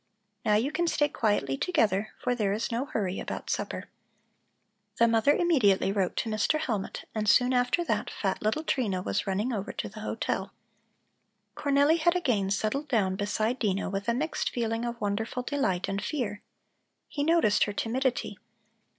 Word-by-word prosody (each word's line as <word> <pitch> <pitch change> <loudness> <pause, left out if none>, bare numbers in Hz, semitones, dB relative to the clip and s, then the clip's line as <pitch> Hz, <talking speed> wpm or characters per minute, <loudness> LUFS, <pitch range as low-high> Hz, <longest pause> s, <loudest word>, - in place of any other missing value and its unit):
Now 210 - +3
you 240 +7 +1
can 345 +2 0
stay 295 -2 +2
quietly 205 - 0
together, 215 - +1
for 250 - 0
there 210 -5 0
is 220 +3 -2
no 235 +4 -1
hurry 195 -9 -2
about - - -4
supper." - - -3 1.1
The 235 - +5
mother 230 +5 +4
immediately 250 - +3
wrote 195 -3 0
to - - -1
Mr. 215 +9 +1
Hellmut, 215 -10 -3
and 215 -1 0
soon 250 +2 +5
after 250 +7 +2
that, - - -1
fat - - -2
little 220 +9 0
Trina 205 - 0
was - - -1
running 205 +6 0
over 200 -3 -3
to - - -4
the 215 +2 -10
hotel. 215 - -3 1.0
Cornelli 285 +3 +3
had 345 +2 +3
again 240 - +1
settled 220 +9 -1
down 200 -8 +1
beside 215 +5 -1
Dino 195 -3 0
with 200 +1 -3
a 235 - +2
mixed 305 +5 -1
feeling 230 -1 -2
of 235 0 -4
wonderful 220 +4 -2
delight 195 -11 0
and 195 0 -2
fear. 220 -9 -3 0.7
He 285 - -3
noticed 315 -10 +4
her 205 - -4
timidity. 245 -1 -1
225 Hz, 170 wpm, -28 LUFS, 205-275 Hz, 1.1 s, The